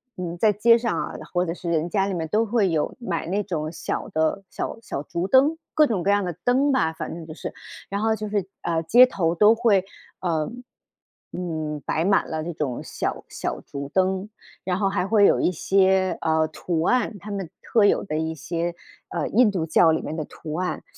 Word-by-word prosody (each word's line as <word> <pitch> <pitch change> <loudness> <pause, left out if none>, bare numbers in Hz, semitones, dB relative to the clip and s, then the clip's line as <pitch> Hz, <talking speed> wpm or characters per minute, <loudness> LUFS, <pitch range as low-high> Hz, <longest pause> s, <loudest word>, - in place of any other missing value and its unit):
嗯， 175 -1 -5
在 210 +2 +3
街 230 +3 +5
上 235 0 -1
啊， - - -4 0.2
或 180 0 +2
者 165 - -2
是 175 -1 -6
人 165 +1 0
家 195 0 +1
里 195 - -2
面 165 -2 -2
都 220 +6 +2
会 215 -4 +2
有 155 -2 -1
买 175 -9 -3
那 200 +3 0
种 155 -6 -3
小 165 - -4
的 160 +5 0
小 - - -5
小 145 -9 -5
竹 170 +4 -3
灯， 280 +6 +4 0.2
各 305 -1 +5
种 210 -9 -1
各 200 - +1
样 205 -1 +3
的 175 - -2
灯 270 +3 +3
吧， 160 -12 +1
反 - - -6
正 165 -1 -8
就 155 - -7
是。 - - -7 0.4
然 200 +1 -2
后 220 0 +2
就 215 0 -5
是， 205 -3 -1
啊， 165 -1 0
街 235 +10 +7
头 175 -9 -1
都 210 +4 +6
会， 225 -4 +4 1.5
呃， - - -4
嗯， 155 -4 -3
摆 160 - 0
满 195 +2 +2
了 160 -1 -3
这 175 - -4
种 140 -6 -3
小 - - -4
小 - - -4
竹 140 0 -7
灯， 190 +1 +1 0.4
然 185 +1 -1
后 195 - +2
还 190 - 0
会 205 0 +5
有 - - +3
一 - - +2
些， 190 +2 +2
啊， 160 -1 +2
图 160 +1 -3
案， 245 -4 +1
他 205 +4 -10
们 195 -3 -4
特 220 -3 +3
有 - - +3
的 155 -5 -3
一 160 0 -1
些， 170 +2 -3 0.4
呃， - - -2
印 225 -1 +4
度 180 -4 -1
教 160 +1 +4
里 160 - 0
面 155 - -5
的 155 - -3
图 155 +1 -8
案， 180 +2 -2
185 Hz, 230 characters per minute, -24 LUFS, 160-210 Hz, 1.5 s, 街